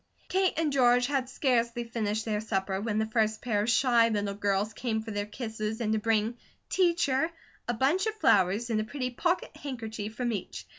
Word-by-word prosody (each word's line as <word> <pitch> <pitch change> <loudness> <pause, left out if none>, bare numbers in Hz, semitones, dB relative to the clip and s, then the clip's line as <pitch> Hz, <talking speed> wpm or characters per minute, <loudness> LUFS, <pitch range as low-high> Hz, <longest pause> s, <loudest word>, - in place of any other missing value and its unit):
Kate 380 0 +2
and 315 -3 +1
George 245 -2 +4
had 270 -2 -1
scarcely 240 -3 +1
finished 220 -2 -2
their 210 -2 -1
supper, 195 -2 -1
when 215 -1 -1
the 220 - +2
first 220 -1 +1
pair 215 -4 0
of 215 - -1
shy 235 -1 +4
little 205 -2 -1
girls 205 +1 0
came 220 -1 -2
for 220 - -6
their 205 0 -2
kisses 220 -1 -4
and 220 -2 0
to 220 - +1
bring 225 +2 +1 0.3
"Teacher" 335 -5 +2 0.4
a 240 - +1
bunch 300 - +2
of 435 - -2
flowers 210 - +3
and 215 -1 +1
a - - -2
pretty 255 +2 -4
pocket 345 +8 -1
handkerchief 220 -6 -6
from 240 0 -1
each. 200 -5 -5
225 Hz, 195 wpm, -29 LUFS, 215-255 Hz, 0.4 s, George